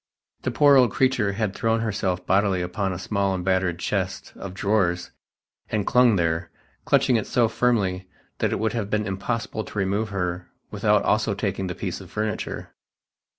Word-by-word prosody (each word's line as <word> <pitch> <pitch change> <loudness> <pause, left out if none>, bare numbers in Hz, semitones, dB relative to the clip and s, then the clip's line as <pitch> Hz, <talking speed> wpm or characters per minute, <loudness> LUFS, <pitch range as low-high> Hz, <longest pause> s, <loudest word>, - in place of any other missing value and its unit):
The - - -1
poor 145 -2 +5
old 125 -2 +6
creature 125 -4 +1
had 105 -1 -1
thrown 115 +1 0
herself 95 -5 -1
bodily 95 -1 +2
upon 95 +2 -2
a 90 - -4
small 100 0 0
and 90 -1 -4
battered 95 -2 +1
chest - - -3
of 95 -1 -8
drawers 95 -4 0 0.6
and 105 -2 -1
clung 125 -3 +5
there, 85 -2 0 0.4
clutching 125 - +3
it 110 - -3
so 120 -2 +3
firmly 100 -6 0 0.3
that - - +1
it - - 0
would 110 0 -1
have 110 -4 -2
been 105 0 0
impossible 110 +3 -3
to - - -10
remove 100 +2 0
her 90 -2 -3 0.2
without 105 0 +2
also 105 -1 +1
taking 95 -2 -2
the 90 - -4
piece - - -4
of - - -12
furniture 105 -1 -4
100 Hz, 175 wpm, -24 LUFS, 95-110 Hz, 0.6 s, old